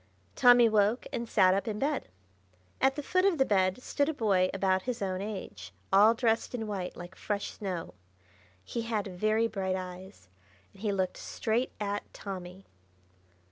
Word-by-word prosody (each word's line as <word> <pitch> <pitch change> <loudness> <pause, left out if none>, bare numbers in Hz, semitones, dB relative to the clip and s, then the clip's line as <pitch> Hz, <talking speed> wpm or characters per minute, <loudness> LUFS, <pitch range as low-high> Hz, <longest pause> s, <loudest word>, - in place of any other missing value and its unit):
Tommy 245 -1 +7
woke, 215 +2 +2
and 235 -1 -3
sat 185 -3 +5
up 195 +4 -1
in 210 -2 -2
bed. 280 +3 -1 0.7
At 270 0 +3
the 295 - -4
foot 370 +5 +1
of 385 -4 +3
the 265 - +3
bed 190 +2 +1
stood 285 +1 0
a 315 - -2
boy 195 -7 +2
about 190 -1 +1
his 250 +3 -4
own 190 -1 -2
age, 185 - -7 0.2
all 210 +4 +7
dressed 230 0 0
in 225 -2 -3
white, 195 -4 -4
like 175 +1 -9
fresh 205 -1 -3
snow. 185 -5 -5 0.7
He 235 - -3
had 225 -3 -2
very 215 +4 +1
bright 190 -4 -2
eyes, 185 - -8 0.5
and 195 - -17
he 210 -2 0
looked 190 -2 -1
straight 230 +3 -2
at 205 -1 -3
Tommy. 185 -1 -7
205 Hz, 170 wpm, -30 LUFS, 190-230 Hz, 0.7 s, Tommy